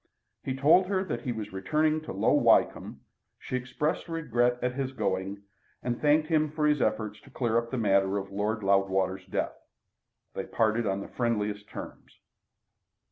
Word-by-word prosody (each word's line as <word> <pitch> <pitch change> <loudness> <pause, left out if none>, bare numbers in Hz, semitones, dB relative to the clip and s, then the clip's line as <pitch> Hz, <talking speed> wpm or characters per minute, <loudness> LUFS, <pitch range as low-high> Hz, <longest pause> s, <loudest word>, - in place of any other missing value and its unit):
He 130 - -3
told 160 +7 +5
her 190 -1 0
that 120 -11 -4
he 125 - -3
was 110 -4 -6
returning 155 +10 +1
to 155 - -7
Low 95 - +2
Wycombe; - - +3 0.4
she - - -5
expressed 130 +7 -2
regret 120 -7 +1
at 125 0 -1
his 135 0 -3
going, 95 -2 -2 0.4
and 120 -1 -2
thanked 150 +1 +3
him 155 -2 +2
for 150 0 -1
his 150 -1 +3
efforts 110 -1 -1
to - - -17
clear 120 -3 +1
up 115 0 -6
the 130 - -3
matter 100 -3 +2
of 100 0 -5
Lord 105 +2 -1
Loudwater's 95 -1 +1
death. - - -2 0.8
They - - -4
parted 110 0 +1
on 95 0 -1
the - - -7
friendliest 105 -4 -2
terms. - - -10
115 Hz, 170 wpm, -28 LUFS, 100-145 Hz, 0.8 s, told